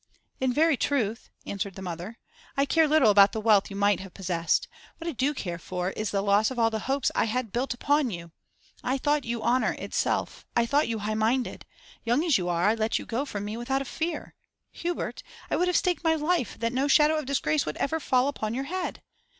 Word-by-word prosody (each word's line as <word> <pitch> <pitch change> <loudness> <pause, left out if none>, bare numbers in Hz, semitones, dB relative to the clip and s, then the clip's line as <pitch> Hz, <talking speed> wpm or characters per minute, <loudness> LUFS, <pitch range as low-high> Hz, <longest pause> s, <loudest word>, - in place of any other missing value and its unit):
'In 260 -1 +1
very 310 +2 +3
truth,' 230 -6 -1 0.2
answered 200 -1 -4
the 190 - -8
mother, 180 +5 -6 0.4
'I 275 - +3
care 320 +2 +3
little 290 -8 +5
about 200 0 +6
the 220 - -2
wealth 210 -2 +4
you 195 - -7
might 200 -1 +2
have 190 -2 -10
possessed. 175 -3 0 0.3
What 330 - -7
I - - 0
do 270 +1 0
care 180 - -5
for 180 +2 -3
is 215 +1 -3
the 195 -1 0
loss 205 +1 +3
of 260 - -7
all 225 -1 +3
the 220 - -2
hopes 275 +1 +1
I - - +2
had 230 0 -2
built 245 +2 -1
upon 285 +1 +2
you. 170 -4 -7 0.5
I 260 +2 0
thought 290 +1 +1
you 230 -1 -3
honour 255 +2 +2
itself; - - -2
I 235 - +4
thought 285 +5 +2
you 230 - -1
high 215 +1 -2
minded. 230 +4 0 0.4
Young 245 +6 +2
as 320 - +3
you 180 -1 -2
are, 175 +3 +2
I - - +4
let 225 0 0
you - - -6
go 250 +5 -2
from 205 -7 -5
me 210 +2 -4
without 265 +3 -1
a - - -14
fear. 325 +6 -4 0.4
Hubert, 350 +1 -4 0.3
I - - +3
would 360 - +1
have 360 - +3
staked 360 -2 0
my 325 -1 +3
life 315 - 0
that 230 +1 -1
no 265 +3 +1
shadow 300 +2 +5
of 305 -4 -4
disgrace 155 - +1
would 150 - -3
ever 320 +3 0
fall 255 -3 +2
upon 220 -6 -3
your 265 - -2
head! 365 +4 -4
235 Hz, 230 wpm, -27 LUFS, 205-285 Hz, 0.5 s, about